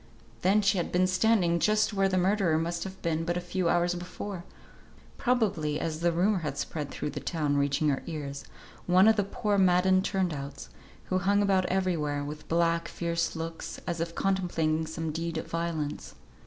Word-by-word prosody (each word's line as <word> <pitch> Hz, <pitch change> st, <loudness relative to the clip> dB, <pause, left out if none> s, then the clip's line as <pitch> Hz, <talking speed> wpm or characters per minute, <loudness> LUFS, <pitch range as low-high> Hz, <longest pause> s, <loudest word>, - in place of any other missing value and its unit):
Then 205 Hz, +3 st, +3 dB
she 200 Hz, -1 st, +3 dB
had 170 Hz, -, -2 dB
been 180 Hz, +1 st, +3 dB
standing 185 Hz, -2 st, +2 dB
just 215 Hz, +3 st, +2 dB
where 195 Hz, -1 st, +2 dB
the 185 Hz, -, +1 dB
murderer 185 Hz, -3 st, +2 dB
must 170 Hz, +2 st, -2 dB
have 190 Hz, 0 st, -8 dB
been 165 Hz, -1 st, 0 dB
but 175 Hz, +1 st, -1 dB
a -, -, 0 dB
few 175 Hz, 0 st, -1 dB
hours 175 Hz, +1 st, +2 dB
before; 180 Hz, +1 st, -6 dB, 0.8 s
probably 200 Hz, -, +1 dB
(as 155 Hz, -1 st, -3 dB
the 170 Hz, +1 st, +2 dB
rumour 185 Hz, +4 st, +2 dB
had 150 Hz, -4 st, -4 dB
spread 150 Hz, -3 st, -4 dB
through 150 Hz, -, -4 dB
the -, -, -5 dB
town, 150 Hz, -4 st, -1 dB
reaching 140 Hz, +2 st, +2 dB
her 135 Hz, -, 0 dB
ears) 145 Hz, -4 st, -5 dB, 0.4 s
one 185 Hz, +3 st, +6 dB
of 220 Hz, -, +6 dB
the 205 Hz, -, +2 dB
poor 205 Hz, 0 st, -1 dB
maddened 185 Hz, 0 st, +4 dB
turn 190 Hz, -4 st, 0 dB
outs, 140 Hz, -, -7 dB, 0.4 s
who 185 Hz, -, +3 dB
hung 200 Hz, +2 st, +2 dB
about 190 Hz, -2 st, +2 dB
everywhere, 165 Hz, -7 st, 0 dB
with 150 Hz, +1 st, -7 dB
black, 170 Hz, 0 st, +2 dB
fierce 170 Hz, -1 st, -2 dB
looks, 165 Hz, 0 st, -5 dB
as 170 Hz, -1 st, -2 dB
if 170 Hz, 0 st, -3 dB
contemplating 165 Hz, -5 st, 0 dB
some 160 Hz, 0 st, -4 dB
deed 165 Hz, +1 st, -3 dB
of -, -, -3 dB
violence. 165 Hz, -3 st, -3 dB
170 Hz, 185 wpm, -28 LUFS, 160-190 Hz, 0.8 s, one